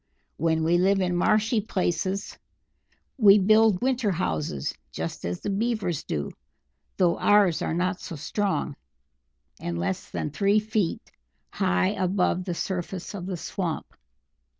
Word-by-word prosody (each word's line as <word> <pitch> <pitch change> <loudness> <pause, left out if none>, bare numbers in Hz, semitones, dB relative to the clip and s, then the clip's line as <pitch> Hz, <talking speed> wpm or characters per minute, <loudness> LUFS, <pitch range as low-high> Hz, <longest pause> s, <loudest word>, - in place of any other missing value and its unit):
When 160 0 +1
we 170 +2 +3
live 195 +2 +3
in 180 -2 0
marshy 215 +5 +2
places 190 -1 -2 0.8
we 205 -3 +8
build 215 0 +4
winter 255 -4 +1
houses, 80 - -2 0.2
just - - -5
as 90 0 -3
the - - -2
Beavers 205 - -1
do, 75 - -3 0.7
though 175 -3 +2
ours 205 -5 +4
are 160 - -1
not 180 +2 -1
so 170 - -6
strong, 175 +1 -2 0.8
and 85 0 -3
less 90 +2 -3
than 150 - -3
three 200 +6 +2
feet 215 -4 -2 0.4
high 90 +1 +1
above 185 -1 0
the 175 -3 -3
surface 185 +1 -4
of 185 -3 -6
the 185 -2 -3
swamp. 170 -1 -3
185 Hz, 135 wpm, -26 LUFS, 160-205 Hz, 0.8 s, we